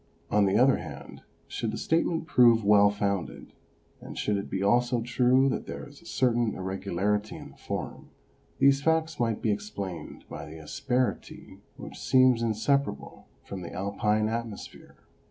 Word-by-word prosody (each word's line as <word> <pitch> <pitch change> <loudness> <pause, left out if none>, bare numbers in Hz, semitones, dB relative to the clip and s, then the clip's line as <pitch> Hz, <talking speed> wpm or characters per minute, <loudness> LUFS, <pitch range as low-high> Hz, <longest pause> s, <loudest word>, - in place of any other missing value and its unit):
On 105 -1 +4
the 95 - +2
other 130 +2 +5
hand, - - -9 0.3
should - - -3
the - - -4
statement 165 0 0
prove 120 -6 +5
well 100 0 +6
founded, 100 -2 -3 0.5
and - - -9
should 105 - 0
it 100 - -4
be 95 - -2
also 120 +3 +2
true 125 +2 +3
that - - -3
there - - -7
is 145 +2 -16
a 170 - -16
certain 120 -6 +1
irregularity 95 +2 -2
in - - -10
the - - -19
form, - - -6 0.5
these 140 0 +4
facts 160 0 0
might 115 -3 -1
be 110 - +2
explained 100 -4 -6
by 80 - -8
the 80 +1 -10
asperity 125 - -3 0.2
which - - -9
seems 130 -2 +4
inseparable 115 +5 -1 0.2
from 95 -2 -7
the 85 - -8
Alpine 105 +2 0
atmosphere. 115 -1 -6
110 Hz, 155 wpm, -27 LUFS, 100-130 Hz, 0.5 s, well